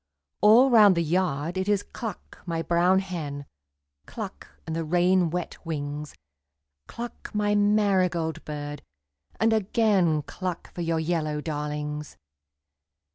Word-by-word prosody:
All 235 +6 +7
round 210 -6 +7
the 170 - +2
yard 170 0 0
it 190 +2 -1
is 205 -1 +2
cluck, 220 -6 -8
my 165 -1 -2
brown 175 +3 +3
hen, 160 -7 -4 0.6
Cluck, - - -7 0.2
and 160 - -4
the 165 - -1
rain 175 +2 +3
wet 175 +1 -5
wings, 150 -2 -5 0.7
Cluck, 240 0 -7
my 205 0 +1
marigold 190 -6 +2
bird, 145 -1 -6 0.6
and 225 0 +3
again 195 -7 +2
Cluck 180 +2 -6
for 175 - -5
your 165 -1 0
yellow 160 -2 -1
darlings. 150 0 -4
175 Hz, 125 wpm, -26 LUFS, 155-195 Hz, 0.7 s, All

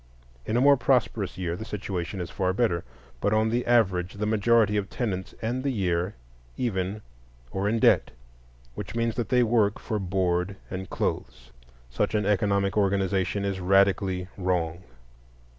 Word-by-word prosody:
In 110 - +1
a - - +3
more 140 +1 +6
prosperous 115 -8 +1
year 85 -2 -2
the 110 - -6
situation 100 -3 -4
is 85 - -5
far 95 -1 0
better; 95 -6 +1 0.4
but 100 - +1
on 110 +1 +2
the 120 +1 -1
average 95 -7 +2
the 105 +1 -2
majority 110 0 +3
of 100 -1 -1
tenants 95 -6 -3
end 125 +3 -1
the 140 - 0
year 90 -5 -1 0.4
even, 100 -2 -2 0.5
or 100 +1 -1
in 115 - +1
debt, - - +4 0.6
which 95 - -7
means 115 -1 0
that 115 -3 -3
they 125 -1 +4
work 110 -3 +2
for 110 -3 -3
board 90 0 0 0.2
and 95 0 -5
clothes. - - -3 0.4
Such 105 +9 0
an 105 -1 +1
economic 100 -1 +1
organization 100 -1 +1
is 100 -1 -2
radically 95 0 +2
wrong. 90 -2 -1
100 Hz, 160 wpm, -26 LUFS, 95-110 Hz, 0.6 s, more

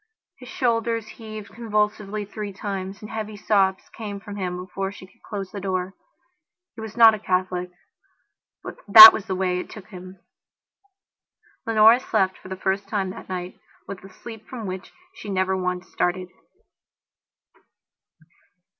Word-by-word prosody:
His 250 -1 -12
shoulders 230 -3 -1
heaved 215 -2 -10
convulsively 210 -2 -2
three 210 0 -7
times, 195 0 -6
and 210 - -9
heavy 215 -1 -5
sobs 195 -2 +1
came 205 -3 -6
from 205 0 -9
him 180 -3 -4
before 185 +1 -5
she 200 -2 -12
could 185 - -26
close 195 -3 -7
the 200 - -7
door. 185 -1 -3 0.8
He 225 - -10
was 220 0 -9
not 225 -1 +8
a 215 - -4
Catholic; 185 -2 -2 0.9
but - - -8
that 220 +2 +13
was 215 - -5
the 190 - -2
way 180 -1 -1
it - - -7
took 210 -3 -12
him. 185 -1 -11 1.5
Leonora 225 +1 +6
slept 190 -7 -1
for - - -13
the 190 - -4
first 195 +1 -2
time 195 -2 -2
that - - -11
night 180 -1 -6 0.3
with 195 -2 -8
a 195 - -13
sleep 225 -2 -12
from 240 -4 -7
which 185 0 -7 0.2
she 210 - -10
never 190 -1 0
once 180 0 -3
started. 180 +1 -2
200 Hz, 155 wpm, -23 LUFS, 185-215 Hz, 1.5 s, that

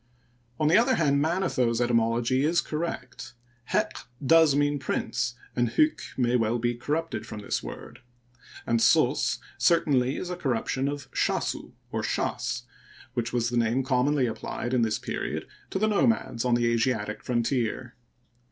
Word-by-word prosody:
On 155 - +2
the 165 - +6
other 255 +3 +3
hand, 140 -3 +2
Manetho's 155 -8 +1
etymology 120 +2 +2
is 165 +3 +3
correct. 150 -7 -5 0.3
Heq - - -1 0.2
does 160 -1 +6
mean 145 0 +1
prince, 120 -2 -2 0.2
and 120 -2 0
hyk 310 0 +3 0.2
may 125 -1 +2
well 115 0 +2
be 120 +1 0
corrupted 150 +2 -3
from 105 -3 -7
this 100 - -2
word; - - -9 0.7
and 115 -1 +1
sos - - +3 0.2
certainly 140 -6 +3
is 180 - -4
a - - -2
corruption 135 -3 -1
of 145 -2 -4
shasu - - -1 0.2
or - - -1
shaSy 125 -1 -2 0.5
which 120 -1 -2
was 120 -1 0
the 120 - 0
name 120 +3 +2
commonly 130 +1 +2
applied 120 +2 -4
in 125 - +3
this 110 -2 +1
penod - - -4 0.2
to - - -2
the 215 +3 +2
nomads 210 - +1
on 125 -1 +3
the 120 0 +1
Asiatic 110 -3 0
frontier. 120 0 -1
125 Hz, 150 wpm, -27 LUFS, 120-150 Hz, 0.7 s, the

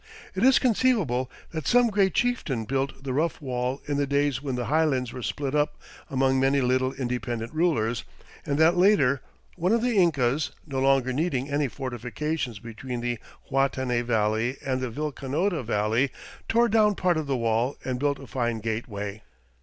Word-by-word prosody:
It - - -3
is 260 +1 +7
conceivable 210 - +2 0.2
that 160 -4 -4
some 245 -2 +4
great 195 -3 +2
chieftain 160 - 0
built 135 +3 -2
the 135 -2 -3
rough 155 +5 0
wall 125 -1 -3
in 145 -1 0
the 145 -1 +1
days 140 -2 +1
when 135 -3 -3
the 125 -1 -2
highlands 140 -5 +1
were 125 - -6
split 140 +3 -3
up 150 0 0 0.3
among 135 -1 +2
many 135 +1 +3
little 130 0 +2
independent 120 -2 -3
rulers, 120 -9 +1 0.4
and 140 - -1
that 160 +2 +5
later 175 -9 +4 0.4
one 180 +2 +1
of 230 0 +2
the 245 -3 +1
Incas, 145 -5 +2
no 135 -4 -3
longer 135 -1 +3
needing 140 -2 -1
any 145 0 +1
fortifications 130 +1 -4
between 120 +3 -6
the 120 -1 -2 0.3
Huatanay 130 -3 +1
Valley 115 +2 0
and 130 -1 -1
the 130 - -2
Vilcanota 150 - -2
Valley, 110 +4 +1 0.4
tore 235 +1 +4
down 210 -1 +3
part 180 -3 +1
of 155 -2 -2
the 135 -2 0
wall 115 +3 0
and 125 -1 -2
built 140 0 +1
a - - -10
fine 120 -3 -1
gateway. 110 -2 -4
135 Hz, 170 wpm, -26 LUFS, 125-155 Hz, 0.4 s, is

